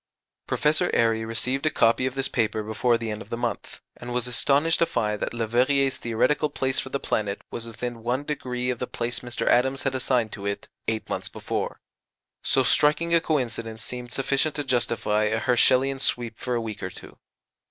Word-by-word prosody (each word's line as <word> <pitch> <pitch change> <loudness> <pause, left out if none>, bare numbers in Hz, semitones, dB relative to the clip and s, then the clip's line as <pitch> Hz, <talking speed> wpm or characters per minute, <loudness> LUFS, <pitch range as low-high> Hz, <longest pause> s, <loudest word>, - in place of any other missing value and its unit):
Professor 155 +4 +2
Airy 115 -1 +3
received 125 +4 -1
a - - +5
copy 115 -1 +3
of 130 - -4
this 135 0 0
paper 110 -2 0
before 115 +3 +1
the 115 -1 -4
end 105 - -5
of 100 - -11
the 115 - -3
month, 120 -1 -4
and 120 0 -8
was 125 0 0
astonished 140 +6 +2
to 170 - +3
find 105 -1 -1
that - - -1
Leverrier's 125 +4 +2
theoretical 130 +6 +1
place 130 -2 0
for 130 - -4
the 140 - -2
planet 100 -5 -1
was 115 0 -5
within 115 +1 -5
1° 125 0 -2
of 120 - -5
the 125 - -3
place 120 +1 -3
Mr. 120 -1 -3
Adams 130 +3 +3
had 135 - 0
assigned 125 -4 +1
to 100 - -8
it 100 - -3 0.2
eight 110 -1 -1
months - - -3
before. - - -4 0.6
So 135 - +3
striking 155 +5 +3
a 170 - +5
coincidence 115 -7 -1
seemed 120 +2 -5
sufficient 140 +3 0
to 145 - -2
justify 115 -4 +1
a 110 +1 +1
Herschelian 130 +2 +3
"sweep" 120 -4 -1
for 125 -1 -2
a 120 - 0
week 110 -2 -6
or - - -3
two. - - -13
125 Hz, 195 wpm, -25 LUFS, 115-135 Hz, 0.6 s, a